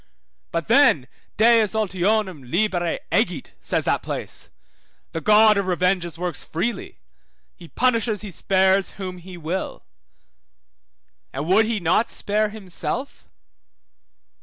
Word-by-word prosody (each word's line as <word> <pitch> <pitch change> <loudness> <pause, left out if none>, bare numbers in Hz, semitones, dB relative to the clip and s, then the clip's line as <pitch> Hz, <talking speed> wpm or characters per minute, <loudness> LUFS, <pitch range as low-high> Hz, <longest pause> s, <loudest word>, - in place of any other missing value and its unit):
But 165 -1 -2
then 230 - +4 0.3
Deus 225 -1 +4
ultionum 190 - 0
libere 175 -3 0
egit - - 0
(says - - -1
that - - +1
place), - - -6 0.6
the 165 - -4
God 215 +2 +6
of 195 - -2
revenges 180 -2 0
works 175 -2 -4
freely, 225 +9 -4 0.6
he 170 - -13
punishes, 230 -1 0
he 210 -2 -7
spares 190 +2 +2
whom 185 -2 -7
he 180 +1 -11
will. 175 +3 -4 1.5
And 140 +3 -4
would 195 +6 +4
he 225 -2 -1
not 180 +6 +2
spare 210 +1 0
himself? 210 - -5
190 Hz, 115 wpm, -22 LUFS, 175-215 Hz, 1.5 s, God